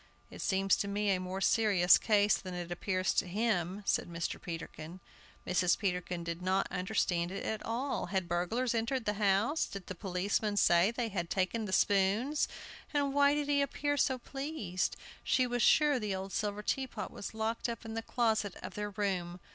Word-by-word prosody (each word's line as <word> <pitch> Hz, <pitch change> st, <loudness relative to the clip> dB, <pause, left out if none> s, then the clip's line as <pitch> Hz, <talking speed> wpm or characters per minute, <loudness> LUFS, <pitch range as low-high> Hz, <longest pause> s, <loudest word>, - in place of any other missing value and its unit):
"It -, -, -8 dB
seems 195 Hz, 0 st, +2 dB
to 200 Hz, -, -2 dB
me 205 Hz, 0 st, 0 dB
a 185 Hz, -, +1 dB
more 185 Hz, +1 st, -4 dB
serious 195 Hz, -4 st, +5 dB
case 210 Hz, -2 st, +3 dB
than 185 Hz, -1 st, -6 dB
it 175 Hz, -1 st, -5 dB
appears 185 Hz, +1 st, 0 dB
to -, -, +1 dB
him," 195 Hz, -1 st, -1 dB
said -, -, +1 dB
Mr. 170 Hz, 0 st, -4 dB
Peterkin. 165 Hz, 0 st, -7 dB, 0.5 s
Mrs. 180 Hz, -1 st, +2 dB
Peterkin 180 Hz, -3 st, -2 dB
did 170 Hz, +1 st, -4 dB
not 190 Hz, +1 st, +1 dB
understand 180 Hz, -2 st, 0 dB
it 195 Hz, -, -5 dB
at 220 Hz, -, -2 dB
all. 245 Hz, +2 st, -2 dB
Had 190 Hz, -1 st, -1 dB
burglars 180 Hz, +9 st, 0 dB
entered 230 Hz, +2 st, -1 dB
the 210 Hz, -, +1 dB
house? 205 Hz, +10 st, +2 dB
Did 200 Hz, -2 st, -8 dB
the 185 Hz, -, -6 dB
policeman 200 Hz, +3 st, -1 dB
say 175 Hz, 0 st, +5 dB
they 235 Hz, 0 st, -2 dB
had 175 Hz, -4 st, -3 dB
taken 200 Hz, +2 st, -1 dB
spoons? 205 Hz, +10 st, +2 dB, 0.4 s
And 285 Hz, -2 st, 0 dB
why 285 Hz, 0 st, +4 dB
did 295 Hz, -1 st, -1 dB
he 285 Hz, -1 st, +3 dB
appear 290 Hz, +1 st, 0 dB
so 265 Hz, -2 st, +2 dB
pleased? 270 Hz, -, -3 dB, 0.3 s
She 255 Hz, -, +2 dB
was 245 Hz, -1 st, -1 dB
sure 295 Hz, -1 st, +5 dB
the 210 Hz, -3 st, -2 dB
old 190 Hz, +1 st, -6 dB
silver 210 Hz, -1 st, -2 dB
teapot 265 Hz, +3 st, -2 dB
was 205 Hz, -, -7 dB
locked 225 Hz, +2 st, -1 dB
up 230 Hz, -1 st, -6 dB
in 220 Hz, -, -6 dB
the 225 Hz, -, -2 dB
closet 220 Hz, -4 st, 0 dB
of -, -, -6 dB
their 210 Hz, 0 st, -3 dB
room. 185 Hz, -3 st, -2 dB
205 Hz, 185 wpm, -32 LUFS, 185-230 Hz, 0.5 s, serious